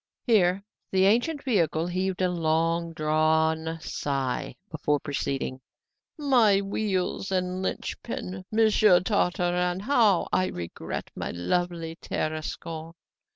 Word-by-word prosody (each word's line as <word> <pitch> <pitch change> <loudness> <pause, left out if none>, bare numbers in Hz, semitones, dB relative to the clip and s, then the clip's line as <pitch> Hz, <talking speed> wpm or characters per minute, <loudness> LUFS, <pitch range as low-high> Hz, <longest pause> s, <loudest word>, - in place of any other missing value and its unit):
Here 195 -5 +3 0.3
the 190 0 +4
ancient 245 +9 +2
vehicle 170 - +1
heaved 185 +1 -1
a 180 - +3
long 165 0 0
drawn 160 +1 +1
sigh 135 -5 -2 0.2
before 150 -2 0
proceeding. 135 -2 -3 0.6
"My 245 -9 +4
wheels 195 -1 -2
and 185 0 -1
linchpin! 185 -1 -4
Monsieur 215 -4 +5
Tartarin, 180 -2 0
how 220 -6 +3
I 185 - +3
regret 85 - -6
my - - -4
lovely 165 - -2
Tarascon! 160 +1 -4
180 Hz, 105 wpm, -27 LUFS, 160-195 Hz, 0.6 s, Monsieur